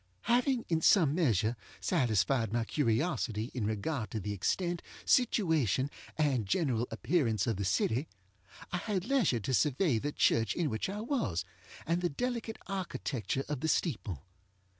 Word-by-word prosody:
Having, 245 Hz, +1 st, +2 dB
in 165 Hz, -2 st, +1 dB
some 160 Hz, -5 st, +5 dB
measure, 120 Hz, -, +2 dB, 0.2 s
satisfied 115 Hz, 0 st, +1 dB
my 115 Hz, 0 st, 0 dB
curiosity 115 Hz, -4 st, 0 dB
in 115 Hz, -5 st, -1 dB
regard 110 Hz, +3 st, -2 dB
to 110 Hz, -, -3 dB
the 105 Hz, +1 st, -3 dB
extent, 175 Hz, -, -1 dB, 0.2 s
situation, 160 Hz, -, +2 dB, 0.3 s
and 135 Hz, -9 st, +1 dB
general 125 Hz, -, +1 dB
appearance 110 Hz, -, +1 dB
of 115 Hz, -5 st, -1 dB
the 100 Hz, -, -2 dB
city, 115 Hz, -, +1 dB, 0.6 s
I 180 Hz, -, 0 dB
had 190 Hz, 0 st, -2 dB
leisure 225 Hz, -, +2 dB
to 130 Hz, -, -2 dB
survey 145 Hz, -, +2 dB
the 145 Hz, +6 st, -2 dB
church 115 Hz, -6 st, +2 dB
in 165 Hz, -6 st, 0 dB
which 110 Hz, +11 st, -2 dB
I 205 Hz, +2 st, -4 dB
was, 130 Hz, -, -1 dB, 0.4 s
and 170 Hz, +2 st, 0 dB
the 175 Hz, -, +1 dB
delicate 235 Hz, -, -3 dB
architecture 140 Hz, -, -3 dB
of 150 Hz, -3 st, -3 dB
the 160 Hz, -, -1 dB
steeple. 105 Hz, -, -1 dB
140 Hz, 150 wpm, -32 LUFS, 110-180 Hz, 0.6 s, some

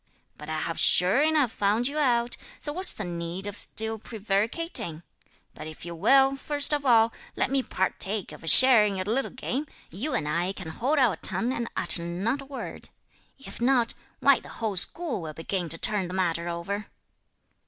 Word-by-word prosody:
But 150 Hz, +1 st, -11 dB
I 155 Hz, 0 st, -3 dB
have 165 Hz, -, -4 dB
sure 185 Hz, +10 st, +5 dB
enough 300 Hz, -5 st, +1 dB
found 210 Hz, +4 st, 0 dB
you 295 Hz, +2 st, -4 dB
out, 240 Hz, -4 st, 0 dB, 0.2 s
so 295 Hz, -, -5 dB
what's 370 Hz, +4 st, +2 dB
the 210 Hz, -, -7 dB
need 170 Hz, +1 st, -5 dB
of 205 Hz, -1 st, -5 dB
still 220 Hz, +1 st, -1 dB
prevaricating? 210 Hz, -, 0 dB, 0.5 s
But -, -, -10 dB
if 155 Hz, +1 st, -11 dB
you 170 Hz, -, -7 dB
will, 270 Hz, +10 st, +3 dB
first 290 Hz, +1 st, +1 dB
of 290 Hz, -2 st, -2 dB
all, 230 Hz, -2 st, +4 dB, 0.2 s
let -, -, -1 dB
me 275 Hz, -1 st, +1 dB
partake 195 Hz, -1 st, -2 dB
of -, -, -13 dB
a -, -, -10 dB
share 255 Hz, +4 st, +10 dB
in 205 Hz, -2 st, -1 dB
your 185 Hz, -1 st, -4 dB
little 240 Hz, +7 st, -1 dB
game, 265 Hz, +3 st, -5 dB, 0.2 s
you 230 Hz, -, -4 dB
and 150 Hz, -, -2 dB
I 170 Hz, +5 st, -1 dB
can 185 Hz, -4 st, -8 dB
hold 265 Hz, -, -2 dB
our 250 Hz, -7 st, +2 dB
tongue 230 Hz, +7 st, -2 dB
and 235 Hz, -2 st, -4 dB
utter 170 Hz, -1 st, -2 dB
not 190 Hz, +11 st, -3 dB
a -, -, -11 dB
word. 270 Hz, -1 st, -7 dB, 0.5 s
If 270 Hz, -3 st, -11 dB
not, 245 Hz, -2 st, +2 dB, 0.3 s
why 280 Hz, -2 st, +4 dB
the -, -, -15 dB
whole 220 Hz, -4 st, -4 dB
school 285 Hz, -, +1 dB
will 155 Hz, -2 st, -7 dB
begin 175 Hz, +1 st, -4 dB
to 165 Hz, -, -3 dB
turn 200 Hz, 0 st, -1 dB
the 180 Hz, -, -7 dB
matter 170 Hz, -2 st, -2 dB
over." 195 Hz, +5 st, -5 dB
215 Hz, 195 wpm, -25 LUFS, 175-265 Hz, 0.5 s, share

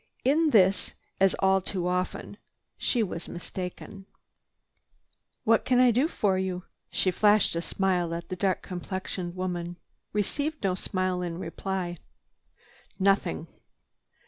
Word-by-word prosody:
In 310 Hz, +4 st, +4 dB
this, 195 Hz, -6 st, +4 dB, 0.2 s
as 195 Hz, 0 st, +4 dB
all 190 Hz, 0 st, +3 dB
too 180 Hz, -1 st, -2 dB
often, 180 Hz, +2 st, -2 dB, 0.4 s
she 240 Hz, -3 st, +1 dB
was 175 Hz, -4 st, -5 dB
mistaken. 180 Hz, +2 st, -7 dB, 1.4 s
"What 225 Hz, 0 st, +4 dB
can 250 Hz, -1 st, +3 dB
I 250 Hz, -1 st, +7 dB
do 255 Hz, +7 st, +3 dB
for 195 Hz, -, +1 dB
you?" 185 Hz, -1 st, -2 dB, 0.3 s
She 185 Hz, -, +1 dB
flashed 210 Hz, -1 st, +4 dB
a 170 Hz, -, 0 dB
smile 180 Hz, -2 st, 0 dB
at 170 Hz, -, -6 dB
the 185 Hz, -, -2 dB
dark 190 Hz, 0 st, 0 dB
complexioned 180 Hz, -1 st, -4 dB
woman. 175 Hz, -1 st, -3 dB
She 170 Hz, -, -44 dB
received 285 Hz, +9 st, -1 dB
no 190 Hz, -2 st, +2 dB
smile 185 Hz, 0 st, -1 dB
in 170 Hz, -2 st, -3 dB
reply. 185 Hz, -1 st, -3 dB, 1.0 s
"Nothing." 195 Hz, -, +2 dB
190 Hz, 130 wpm, -28 LUFS, 180-205 Hz, 1.4 s, I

